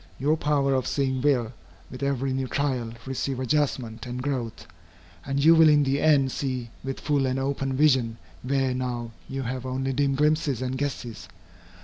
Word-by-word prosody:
Your 145 +4 +2
power 145 -3 +1
of 130 -1 0
seeing 130 -2 0
will, 125 -5 +1 0.4
with 130 - -8
every 135 -1 0
new 130 0 -1
trial, 130 -5 -1
receive 135 0 -2
adjustment 130 -4 -1
and 125 +1 -4
growth, 120 - -3 0.6
and 140 +1 0
you 165 - +9
will 160 -1 +7
in 150 -1 +5
the 140 +1 0
end 140 -4 +4
see 125 -4 -3
with 135 0 -4
full 145 -3 +1
and 130 0 -1
open 135 0 -1
vision 130 -5 +3 0.2
where 135 0 0
now 120 -2 -3 0.2
you 135 0 -3
have 125 +1 -4
only 130 +1 -2
dim 140 0 +1
glimpses 150 -2 +1
and 130 0 -2
guesses. 130 -4 -4
135 Hz, 170 wpm, -26 LUFS, 125-140 Hz, 0.6 s, you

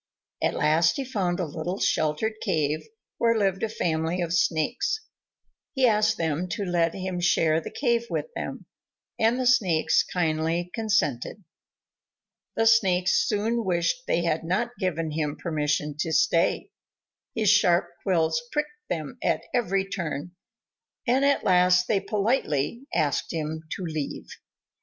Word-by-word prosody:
At - - +1
last 160 +2 +3
he 275 - -2
found 195 -8 -1
a 180 - 0
little 160 +5 -4
sheltered 155 +8 +1
cave, 155 -6 -1 0.3
where 230 -1 +3
lived 195 -3 +1
a 225 - 0
family 165 -3 -1
of 170 -1 -1
Snakes. 180 - +1 0.7
He 265 -2 +3
asked 215 -1 +3
them 165 +2 -1
to 210 -2 -3
let 170 -2 +1
him 185 -1 -3
share 165 -2 +2
the - - -7
cave 235 -3 0
with - - -2
them, - - -5 0.5
and 230 +3 +2
the 255 - 0
Snakes 180 -10 +3
kindly 165 0 -1
consented. 200 - -1 1.1
The 225 - +2
Snakes 190 -5 +3
soon 225 +2 0
wished 180 +7 -1
they 170 - +1
had 165 -1 0
not 190 +8 -1
given 165 -5 -1
him 150 -1 -2
permission 150 -2 -1
to 160 - -1
stay. 165 +2 +2 0.6
His 215 -3 +3
sharp 180 -4 +4
quills 160 -4 +1
pricked 300 0 -4
them 165 - -4
at - - 0
every 195 -5 0
turn, 175 -3 -4 0.8
and 255 +3 +3
at 280 0 +2
last 180 0 +4
they 205 - +2
politely 210 - -1
asked 145 -3 0
him 160 -1 -3 0.2
to - - -6
leave. 155 -3 -4
180 Hz, 145 wpm, -26 LUFS, 160-220 Hz, 1.1 s, sharp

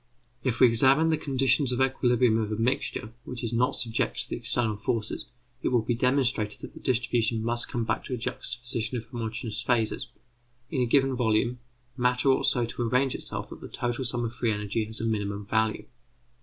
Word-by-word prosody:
If 120 -3 -1
we - - +8
examine 130 +7 +6
the 160 - +3
conditions 135 -1 +2
of 125 - -1
equilibrium 125 -3 +3
of 110 -1 -2
a - - 0
mixture 115 -1 -1
which 125 0 -6
is 115 - -2
not 125 +4 +2
subjected 115 -1 0
to - - -2
external 115 -3 0
forces, 110 0 -2 0.4
it - - -1
will 120 -3 +2
be 120 - 0
demonstrated 125 -3 +1
that - - -9
the - - -11
distribution 115 -2 0
must 120 +1 0
come 120 - -2
back - - -1
to 130 - -3
a - - -6
juxtaposition 120 -1 -3
of 115 - -6
homogeneous 115 -1 -4
phases; 120 -3 0 0.6
in 135 -5 0
a 125 - +2
given 135 +1 +3
volume, 120 +1 +1 0.4
matter 125 +2 +2
ought 130 - +3
so 120 -2 +2
to 115 - -6
arrange 125 +3 +1
itself - - -6
that - - -10
the - - -8
total 120 +2 -2
sum 120 -1 -1
of 115 - -4
free 115 -1 0
energy 105 +1 -2
has 110 +1 -6
a 115 - -2
minimum 105 -2 -2
value. 110 +1 0
120 Hz, 195 wpm, -27 LUFS, 110-125 Hz, 0.6 s, we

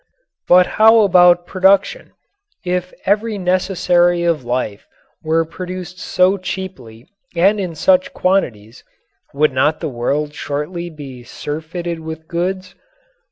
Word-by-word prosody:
But 180 0 +6 0.2
how 225 +1 +7
about 180 -3 +5
production? 195 - +1 0.5
If 180 0 -2
every 210 +2 0
necessary 180 -1 +1
of 165 -5 0
life 120 -4 -3 0.3
were 165 +1 +1
produced 180 +2 -8
so 190 +1 +1
cheaply 135 -12 -7 0.3
and 195 +5 +3
in 180 -4 -4
such 275 - +2
quantities, 125 - -1 0.5
would 145 0 +1
not 150 +4 +1
the - - -3
world 145 +4 -2
shortly 150 +5 -4
be 140 -6 -10
surfeited 160 +6 -6
with 160 0 -8
goods? 185 +2 -3
175 Hz, 115 wpm, -18 LUFS, 150-185 Hz, 0.5 s, how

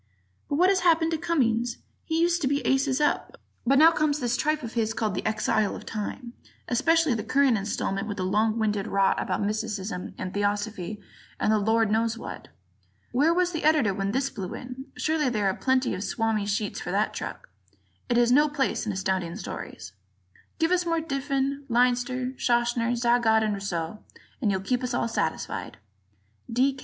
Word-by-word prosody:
But 285 - 0
what 360 +5 +4
has 390 -1 +3
happened 330 -2 +3
to 325 - 0
Cummings? 240 -8 +1 0.3
He 320 0 0
used 345 +1 +2
to 275 - +1
be 280 +1 0
aces 270 0 +2
up, 295 - 0 0.3
but 275 +2 +5
now 320 +3 +8
comes 305 -2 +1
this 245 -2 0
tripe 305 +3 0
of 230 - -6
his 225 -1 0
called 215 -4 -1
"The 185 - -3
Exile 215 -1 +1
of - - -9
Time"; 235 +3 -5 0.3
especially 325 +3 +3
the 220 -2 -2
current 275 -3 +3
installment 195 0 -2
with 205 - -4
its 185 - -1
long 215 +4 +1
winded 210 -2 0
rot 195 -1 +2
about - - -1
mysticism 210 -2 -3
and 185 - -5
theosophy 205 -1 -2 0.4
and - - +2
the 215 - +3
Lord 220 +1 +2
knows 225 +1 +1
what. - - -8 0.6
Where 285 +7 +3
was 360 +1 +2
the 325 - -4
Editor 295 -10 +3
when 195 +1 -2
this 270 +4 0
blew 185 -3 -5
in? 255 +1 -8
Surely 305 -3 +1
there 210 -4 -1
are 190 - +2
plenty 260 +3 +1
of 185 - -4
Swami 220 -2 -1
sheets 205 0 -2
for - - -5
that - - 0
truck; - - -6 0.6
it 240 - +2
has 240 0 +4
no 295 +4 +5
place 275 -5 -1
in - - 0
Astounding 190 -3 -2
Stories. 95 - -7 0.6
Give 325 +1 +1
us 360 -1 +3
more 335 -1 0
of 325 0 -4
Diffin, 275 0 -1
Leinster, 250 +1 +1
Schachner, 240 0 +1
Zagat 235 -2 +3
and 215 -1 0
Rousseau, 195 -1 -3 0.4
and 220 - +2
you'll 190 -1 0
keep 250 +6 -1
us 250 -1 -1
all 235 - 0
satisfied. 230 - -3 0.7
D. 260 +4 +2
240 Hz, 190 wpm, -26 LUFS, 210-280 Hz, 0.7 s, now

